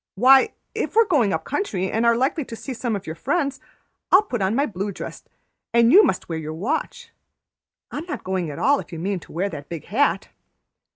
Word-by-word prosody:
"Why, 260 Hz, +6 st, +6 dB, 0.2 s
if -, -, -3 dB
we're 455 Hz, 0 st, +6 dB
going 275 Hz, -, +2 dB
up 160 Hz, -1 st, -1 dB
country 195 Hz, -, -2 dB
and 230 Hz, +2 st, +1 dB
are 235 Hz, 0 st, +4 dB
likely 275 Hz, +5 st, 0 dB
to 230 Hz, -, -8 dB
see 265 Hz, +4 st, -6 dB
some 235 Hz, -2 st, -2 dB
of 195 Hz, -, -6 dB
your 160 Hz, -, -5 dB
friends, 280 Hz, -, -1 dB, 0.5 s
I'll 380 Hz, +3 st, +7 dB
put 245 Hz, -, -4 dB
on 190 Hz, +3 st, +1 dB
my 280 Hz, +3 st, +2 dB
blue 200 Hz, -3 st, -4 dB
dress, -, -, -8 dB, 0.5 s
and 235 Hz, 0 st, +5 dB
you 390 Hz, -, +9 dB
must -, -, 0 dB
wear 165 Hz, -1 st, -3 dB
your 155 Hz, 0 st, -6 dB
watch; 315 Hz, -, -3 dB, 0.8 s
I -, -, -4 dB
am 320 Hz, -, -7 dB
not 295 Hz, -8 st, -5 dB
going 185 Hz, -3 st, -2 dB
at 145 Hz, -, -7 dB
all 285 Hz, +1 st, +3 dB
if -, -, -9 dB
you 165 Hz, -, -6 dB
mean 190 Hz, +3 st, -2 dB
to -, -, -16 dB
wear 180 Hz, +5 st, -1 dB
the 170 Hz, -, -6 dB
big 155 Hz, +2 st, -8 dB
hat." 275 Hz, +8 st, +1 dB
230 Hz, 225 wpm, -23 LUFS, 185-285 Hz, 0.8 s, you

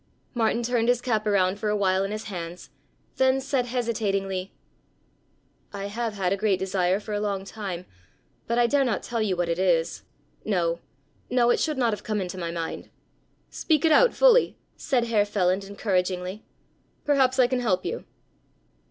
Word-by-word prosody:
Martin 230 Hz, 0 st, +1 dB
turned 235 Hz, -1 st, +1 dB
his 245 Hz, -1 st, +3 dB
cap 220 Hz, -4 st, -1 dB
around 195 Hz, -1 st, +2 dB
for 215 Hz, -, -1 dB
a 210 Hz, -, +1 dB
while 190 Hz, -1 st, +2 dB
in 195 Hz, -, -2 dB
his 215 Hz, +1 st, -4 dB
hands, 175 Hz, -3 st, -7 dB, 0.5 s
then 260 Hz, 0 st, +3 dB
said 265 Hz, -2 st, -1 dB
hesitatingly: 200 Hz, -6 st, -2 dB, 1.2 s
"I 200 Hz, 0 st, -5 dB
have 225 Hz, 0 st, -3 dB
had 190 Hz, -2 st, 0 dB
a -, -, -1 dB
great 200 Hz, -2 st, +2 dB
desire 190 Hz, 0 st, 0 dB
for 210 Hz, 0 st, -7 dB
a 205 Hz, -, 0 dB
long 200 Hz, -2 st, -2 dB
time, 195 Hz, -4 st, -6 dB, 0.6 s
but 235 Hz, -, 0 dB
I 240 Hz, -, +5 dB
dare 275 Hz, +3 st, +3 dB
not 240 Hz, -5 st, -1 dB
tell 235 Hz, -2 st, -2 dB
you 200 Hz, -4 st, +1 dB
what 175 Hz, -1 st, 0 dB
it 170 Hz, +1 st, -1 dB
is; 170 Hz, -3 st, +1 dB, 0.4 s
no, 170 Hz, -5 st, 0 dB, 0.5 s
no, 240 Hz, -1 st, +3 dB
it -, -, +2 dB
should 305 Hz, -3 st, 0 dB
not 235 Hz, -4 st, +2 dB
have 205 Hz, -, -6 dB
come 215 Hz, -1 st, -1 dB
into 185 Hz, -1 st, -4 dB
my 170 Hz, -1 st, -3 dB
mind." 165 Hz, -1 st, -5 dB, 0.6 s
"Speak 315 Hz, -2 st, +1 dB
it 320 Hz, -, +4 dB
out 485 Hz, +10 st, +6 dB
fully," -, -, +5 dB, 0.2 s
said 255 Hz, -5 st, 0 dB
Herr 225 Hz, -3 st, +2 dB
Feland 195 Hz, -2 st, 0 dB
encouragingly, 185 Hz, -1 st, -2 dB, 0.6 s
"perhaps 265 Hz, -3 st, +3 dB
I 255 Hz, -, +6 dB
can 255 Hz, +1 st, 0 dB
help 190 Hz, -7 st, 0 dB
you." -, -, -4 dB
210 Hz, 180 wpm, -25 LUFS, 185-240 Hz, 1.2 s, out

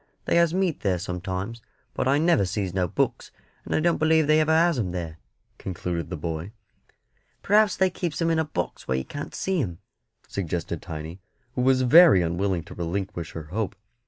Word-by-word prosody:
They -, -, +1 dB
has 170 Hz, -1 st, +4 dB
meat 185 Hz, -3 st, 0 dB
there 95 Hz, -3 st, 0 dB
sometimes; 95 Hz, +5 st, -4 dB, 0.3 s
but -, -, -1 dB
I 140 Hz, +2 st, +4 dB
never 160 Hz, -8 st, +3 dB
sees 95 Hz, 0 st, -2 dB
no 90 Hz, -1 st, +1 dB
books, -, -, -1 dB, 0.3 s
and -, -, -2 dB
I -, -, +3 dB
don't 170 Hz, +1 st, +2 dB
believe 160 Hz, 0 st, +4 dB
they 155 Hz, +1 st, +4 dB
ever 155 Hz, 0 st, +2 dB
has 165 Hz, -2 st, +3 dB
'em 90 Hz, -6 st, -2 dB
there," 85 Hz, -3 st, -5 dB, 0.4 s
concluded 90 Hz, -2 st, -4 dB
the 90 Hz, -, -4 dB
boy. 80 Hz, +5 st, -5 dB, 0.9 s
"Perhaps 210 Hz, 0 st, +4 dB
they 190 Hz, -1 st, +3 dB
keeps 170 Hz, -3 st, -3 dB
'em 165 Hz, -1 st, +2 dB
in 165 Hz, -, +2 dB
a -, -, +2 dB
box 155 Hz, -, -4 dB
where 65 Hz, -, +1 dB
you 65 Hz, -, -3 dB
can't 145 Hz, 0 st, -7 dB
see 190 Hz, -3 st, 0 dB
'em," 90 Hz, -8 st, -4 dB, 0.5 s
suggested 90 Hz, -3 st, -3 dB
Tiny, 80 Hz, +3 st, -7 dB, 0.3 s
who 125 Hz, -, -1 dB
was 130 Hz, 0 st, +3 dB
very 140 Hz, -, +7 dB
unwilling 85 Hz, +1 st, -1 dB
to -, -, -11 dB
relinquish 85 Hz, -1 st, -4 dB
her 80 Hz, -2 st, -8 dB
hope. 110 Hz, -1 st, -2 dB
100 Hz, 190 wpm, -25 LUFS, -, 0.9 s, very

